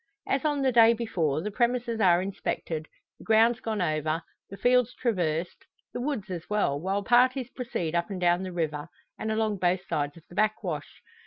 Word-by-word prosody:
As 270 -1 0
on 290 -2 +1
the 260 - +3
day 230 -1 +7
before, 170 -10 -1
the 210 - -3
premises 240 0 0
are 180 -2 +5
inspected, 165 -4 -4 0.3
the - - -12
grounds 225 +2 +4
gone 220 -5 -2
over, 155 0 -1 0.3
the 195 - -9
fields 250 0 +3
traversed, 175 -8 -2 0.3
the - - -3
woods 245 -8 -3
as 175 -2 -6
well, 205 -9 +1
while 195 +3 -1
parties 250 +3 +3
proceed 180 -10 -3
up 170 +2 0
and 195 -2 -4
down 175 0 +3
the 185 -1 -5
river, 155 -3 -2 0.3
and 220 - -2
along 220 -1 0
both 180 +1 +1
sides 145 +1 -2
of 165 - -15
the - - -15
backwash. 190 -7 -2
200 Hz, 185 wpm, -27 LUFS, 170-235 Hz, 0.3 s, day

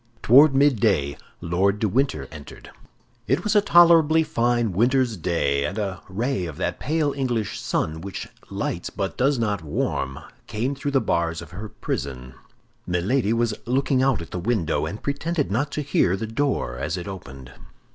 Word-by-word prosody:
Toward 135 +4 +7
midday, 110 - +3 0.3
Lord 95 +4 +1
de 110 - 0
Winter 100 - 0
entered. 75 -2 -11 0.6
It 140 +8 +1
was 210 0 0
a 210 - +6
tolerably 165 -4 +6
fine 120 -6 +1
winter's 120 +4 +2
day, 75 -6 0
and 100 - -3
a 95 -3 -3
ray 100 -1 -1
of 80 -3 -8
that 95 - -2
pale 150 0 0
English 120 -6 -2
sun 80 +1 -2
which 100 +1 -6 0.2
lights - - -3
but - - -4
does 135 +2 +2
not 105 -5 -1
warm 65 -3 -2 0.3
came 120 +6 -2
through 140 +1 -3
the 135 -2 +2
bars 85 -1 0
of 85 -3 -10
her 105 +4 -7
prison. 65 -7 -5 0.5
Milady 100 +7 +1
was 115 -1 +1
looking 130 +1 +1
out 130 -9 +2
at - - -14
the 90 - -3
window, 85 -6 0
and 100 +7 -7
pretended 145 - -1
not 140 +8 0
to 150 - -2
hear 95 -9 +2
the 110 - -3
door 115 - -1
as 75 +7 -2
it 85 - -6
opened. 70 -9 -9
110 Hz, 170 wpm, -24 LUFS, 85-135 Hz, 0.6 s, Toward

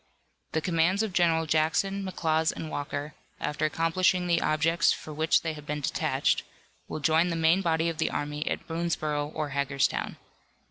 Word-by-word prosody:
The 160 - +1
commands 180 +4 +2
of 215 -4 -3
General 165 -2 +3
Jackson, 165 +6 +1
McLaws 160 -4 0
and 160 - -7
Walker, 145 +1 -4 0.3
after 150 +1 -1
accomplishing 165 +4 +1
the 170 -1 +2
objects 165 +2 +2
for 155 - -5
which 160 +2 +2
they 160 -1 -2
have 150 -1 -11
been 150 0 -2
detached, - - +1 0.5
will - - -5
join 160 +4 +3
the 165 - -1
main 165 +3 +3
body 165 -2 +1
of 165 -1 -3
the - - +1
army 150 +1 -3
at - - -2
Boonsborough 155 -3 -2
or 155 -2 -2
Hagerstown. 140 -1 -1
160 Hz, 170 wpm, -28 LUFS, 150-170 Hz, 0.5 s, General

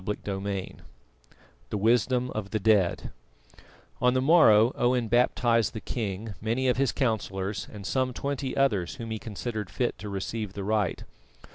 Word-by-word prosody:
CHAPTER 100 -1 -4
XI 100 -2 -4 0.9
THE - - -2
WISDOM 120 +4 +2
OF 105 -2 -4
THE 110 - -1
DEAD 100 -4 +2 0.9
On 125 0 +3
the - - +3
morrow 130 -7 +6
Owen 120 -1 +1
baptised 120 -1 +2
the 110 - -4
king, 105 -2 -4
many 115 +5 0
of 125 - +2
his 135 -1 +2
councillors, 105 -6 -2
and 105 -3 -9
some 130 +5 0
twenty 140 +1 -3
others 105 -11 +1
whom 115 -1 -7
he 110 - -3
considered 110 -1 -5
fit 120 -6 -2
to 105 +2 -6
receive 100 +1 -4
the 100 - -5
rite. 105 -3 0
110 Hz, 155 wpm, -27 LUFS, 100-125 Hz, 0.9 s, morrow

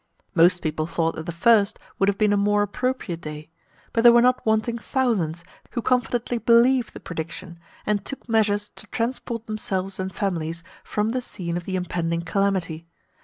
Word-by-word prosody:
Most 180 0 +4
people 155 0 -1
thought 165 -1 0
that 160 +2 -7
the - - -1
first 215 +3 +3 0.2
would 195 - +4
have 200 - 0
been 210 -1 +3
a - - +4
more 205 +1 +3
appropriate 205 -5 -2
day; 150 0 -8 0.4
but 230 - +2
there 240 0 +9
were 240 - +6
not 255 0 +3
wanting 220 +2 +1
thousands 200 - 0 0.3
who 240 - -1
confidently 245 -1 0
believed 240 +2 +4
the - - -7
prediction, 170 +1 -6 0.3
and 205 -2 0
took 275 - -6
measures 210 -2 +2
to 210 - -9
transport 230 -1 -3
themselves 195 -3 -3
and 190 0 -2
families 170 -4 -3 0.2
from 210 +1 -1
the 250 +2 -1
scene 175 -8 -5
of 175 -1 -4
the 190 - -3
impending 170 -2 -1
calamity. 175 -3 -1
200 Hz, 175 wpm, -24 LUFS, 170-230 Hz, 0.4 s, there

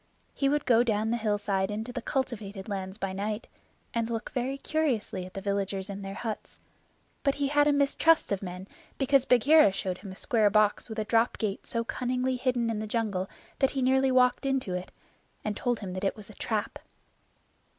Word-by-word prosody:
He 275 - +1
would 295 0 +1
go 235 -2 +5
down 220 -2 +1
the - - +2
hillside 205 -3 0
into 220 +4 -4
the 250 - -3
cultivated 220 -7 -3
lands 190 -1 -4
by 195 -3 -3
night, 210 +3 -3 0.5
and 230 -1 0
look 230 -1 -3
very 260 +2 -2
curiously 265 -12 -1
at 185 - -16
the 195 - -4
villagers 200 0 -2
in 200 0 -6
their 195 0 -6
huts, 220 -3 -5 0.6
but 275 -1 +2
he 280 -1 0
had 290 0 +4
a - - +5
mistrust 285 +2 +3
of 200 - 0
men 180 0 -6 0.3
because 270 -1 +3
Bagheera 270 0 +6
showed 185 -1 -3
him 195 -1 -8
a - - -9
square 215 +1 +2
box 210 +2 +2
with 220 - -6
a 215 - -1
drop 230 +2 +2
gate 210 -3 -3
so 230 -1 -1
cunningly 255 +2 -1
hidden 245 -2 0
in 215 - -2
the 215 - -4
jungle 205 -4 -1 0.3
that 270 - +4
he 270 -2 -2
nearly 265 +1 +3
walked 250 -1 +4
into 265 -8 0
it, 180 0 -4 0.5
and 210 -1 -1
told 245 0 -1
him 190 -3 -5
that 185 +1 -5
it 195 - +1
was 215 0 -10
a - - -14
trap. 215 +1 -2
220 Hz, 200 wpm, -29 LUFS, 200-255 Hz, 0.6 s, Bagheera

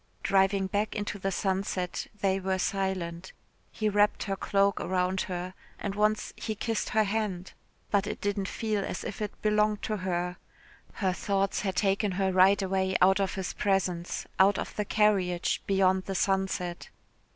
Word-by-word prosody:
Driving 195 0 +3
back 205 +2 -1
into 205 -1 -3
the 195 +1 -1
sunset 190 -1 -2
they 195 -1 +2
were 190 0 -1
silent. 185 -2 -2 0.4
He 215 - -1
wrapped 205 0 +2
her 195 - -2
cloak 200 0 +1
round 185 0 0
her, 180 0 -4 0.2
and 200 - -3
once 210 +1 +1
he 220 - -4
kissed 225 +1 -2
her 220 - +3
hand, 200 -3 -2 0.4
but 205 0 +2
it - - -4
didn't 200 -1 -1
feel 215 -2 -1
as - - -4
if 205 - -6
it 210 -1 -4
belonged 210 0 +2
to 215 - -1
her. 180 -1 -2 0.6
Her 190 -3 0
thoughts 195 +1 0
had 190 -3 -2
taken 195 +1 +1
her 190 0 +1
right 190 +2 +5
away 190 0 0
out 190 +1 +5
of 195 0 0
his 190 -2 -3
presence, 185 -3 -1
out 195 +1 +5
of - - -5
the 210 - -1
carriage 190 -5 +2
beyond 190 -1 +3
the 195 - -4
sunset. 190 -2 -1
195 Hz, 165 wpm, -29 LUFS, 185-205 Hz, 0.6 s, right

